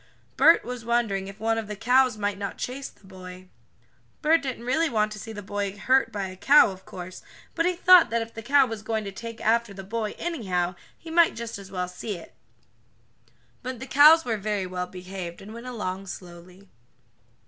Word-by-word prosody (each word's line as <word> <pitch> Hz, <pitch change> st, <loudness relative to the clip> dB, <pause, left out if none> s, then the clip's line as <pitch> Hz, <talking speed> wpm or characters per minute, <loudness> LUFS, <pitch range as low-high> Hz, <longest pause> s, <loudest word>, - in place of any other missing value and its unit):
Bert 330 Hz, -, +5 dB
was 250 Hz, -1 st, -6 dB
wondering 225 Hz, -5 st, 0 dB
if 195 Hz, +1 st, -10 dB
one 225 Hz, +1 st, 0 dB
of 220 Hz, -, -6 dB
the 210 Hz, -, -5 dB
cows 245 Hz, +2 st, +3 dB
might 205 Hz, -1 st, -2 dB
not 200 Hz, -1 st, -5 dB
chase 265 Hz, +2 st, -5 dB
the -, -, -23 dB
boy. 185 Hz, -1 st, -11 dB, 0.7 s
Bert 320 Hz, +2 st, +4 dB
didn't 255 Hz, -4 st, -5 dB
really 315 Hz, +6 st, +1 dB
want 215 Hz, -4 st, +1 dB
to 215 Hz, -, -7 dB
see 225 Hz, -, -8 dB
the 205 Hz, -2 st, -8 dB
boy 200 Hz, 0 st, -3 dB
hurt 260 Hz, +4 st, +2 dB
by 200 Hz, -3 st, -3 dB
a 185 Hz, 0 st, -7 dB
cow, 275 Hz, +4 st, +6 dB
of 190 Hz, 0 st, -12 dB
course, 180 Hz, 0 st, -9 dB, 0.3 s
but 330 Hz, -, +1 dB
he 360 Hz, -, 0 dB
thought 360 Hz, 0 st, +7 dB
that 230 Hz, 0 st, 0 dB
if 225 Hz, -, -13 dB
the 225 Hz, -, -7 dB
cow 275 Hz, +4 st, +4 dB
was 225 Hz, -3 st, -6 dB
going 220 Hz, 0 st, -2 dB
to 200 Hz, -, -6 dB
take 230 Hz, +3 st, -8 dB
after 225 Hz, -2 st, +1 dB
the 195 Hz, -, -8 dB
boy, 215 Hz, +2 st, -3 dB
anyhow, 185 Hz, -, -2 dB, 0.2 s
he 325 Hz, -, -11 dB
might 335 Hz, 0 st, +4 dB
just 230 Hz, -2 st, -6 dB
as 195 Hz, -1 st, -11 dB
well 180 Hz, -2 st, -3 dB
see 180 Hz, +3 st, -6 dB
it. 165 Hz, -, -14 dB, 1.3 s
But 255 Hz, -1 st, -6 dB
the 260 Hz, -, -6 dB
cows 305 Hz, +4 st, +7 dB
were 225 Hz, -3 st, -1 dB
very 205 Hz, -1 st, -2 dB
well 180 Hz, 0 st, -4 dB
behaved, 180 Hz, -1 st, -8 dB
and 205 Hz, +3 st, -11 dB
went 235 Hz, +2 st, -9 dB
along 195 Hz, -5 st, -4 dB
slowly. 180 Hz, +2 st, -11 dB
215 Hz, 205 wpm, -26 LUFS, 190-250 Hz, 1.3 s, thought